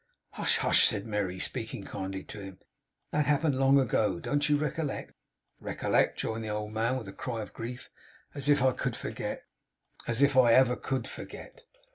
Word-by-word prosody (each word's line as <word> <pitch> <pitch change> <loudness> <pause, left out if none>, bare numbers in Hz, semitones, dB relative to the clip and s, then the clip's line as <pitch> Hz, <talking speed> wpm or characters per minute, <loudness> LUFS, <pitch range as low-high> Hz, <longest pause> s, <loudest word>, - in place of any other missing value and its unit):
'Hush! - - +1
Hush!' - - +5
said 105 -2 -1
Merry, 100 -4 -2
speaking - - -4
kindly 95 0 -5
to 105 - -8
him. 95 -1 -9 0.5
'That 150 -1 +1
happened 150 0 +3
long 135 +1 +5
ago. 105 -7 +1
Don't 145 +7 0
you 145 - +4
recollect?' 150 0 -3 0.5
'Recollect!' - - +1
rejoined 110 0 -3
the 110 - -4
old 105 0 -3
man, 115 +4 +1
with 115 -6 -7
a 95 - -8
cry 115 -1 -4
of - - -12
grief. 125 +2 -7 0.5
'As 140 0 -2
if 145 -2 +4
I 130 - +5
could - - -2
forget! - - -5 0.6
As 120 +4 +2
if 140 -1 +4
I 125 -3 +6
ever 125 -1 +5
could 130 -2 -3
forget! - - -10
125 Hz, 180 wpm, -29 LUFS, 105-140 Hz, 0.6 s, I